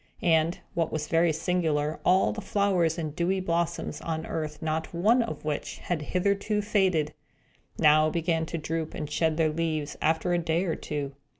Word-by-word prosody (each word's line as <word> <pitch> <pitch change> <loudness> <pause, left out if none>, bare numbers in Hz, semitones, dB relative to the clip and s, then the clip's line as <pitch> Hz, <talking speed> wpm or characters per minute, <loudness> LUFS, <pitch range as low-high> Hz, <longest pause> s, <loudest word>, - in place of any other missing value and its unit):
And, 165 0 +3 0.2
what 165 -2 0
was 155 -1 -2
very 165 0 +3
singular, 155 -3 0
all 185 +1 +4
the 215 - -5
flowers 195 -5 +1
and 155 -3 -4
dewy 180 +3 +1
blossoms 170 -1 -2
on 160 -1 -3
earth 150 -2 -4
not 160 +1 -3
one 220 +8 +4
of 230 -8 -5
which 150 -2 -3
had 175 -4 -3
hitherto 200 +6 0
faded, 185 -8 +1 0.6
now 155 +1 +5
began 165 0 0
to 170 - -3
droop 160 0 -3
and 150 - -4
shed 160 +1 0
their 160 -2 +2
leaves, 155 -2 -2
after 160 +3 +1
a 175 - +2
day 165 +1 0
or 170 -4 -1
two. 145 -2 -4
165 Hz, 175 wpm, -27 LUFS, 155-180 Hz, 0.6 s, now